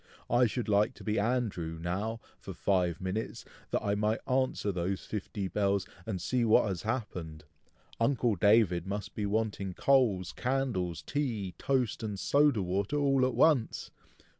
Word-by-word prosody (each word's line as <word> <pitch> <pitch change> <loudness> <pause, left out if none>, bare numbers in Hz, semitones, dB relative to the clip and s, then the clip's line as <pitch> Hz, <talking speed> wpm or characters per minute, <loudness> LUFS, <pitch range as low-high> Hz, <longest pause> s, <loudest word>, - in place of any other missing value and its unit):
"I 120 +1 +5
should 120 +2 -3
like 105 0 +2
to - - -12
be 105 -1 0
Andrew, 100 -8 -1
now, 100 +7 -3 0.2
for - - -8
five 90 -4 +1
minutes, 95 +4 -4 0.2
that - - -1
I 100 - +1
might 105 +2 -1
answer 130 -5 +1
those 95 +1 -2
fifty 100 -1 -4
bells, 100 0 0 0.2
and 95 -5 -2
see 125 +7 0
what 110 -1 +4
has 95 -4 -3
happened. 90 -10 -4 0.6
Uncle 115 -2 +2
David 95 -3 +3
must 100 0 -4
be 105 -1 -2
wanting 100 -3 -1
coals, 115 -10 +2
candles, 115 - -2
tea, 110 - -2
toast, 130 -5 0
and 105 -3 -4
soda 140 -6 +3
water, 95 +9 -1
all 135 -3 +3
at 130 - -3
once! 145 -8 +2
105 Hz, 155 wpm, -30 LUFS, 95-125 Hz, 0.6 s, I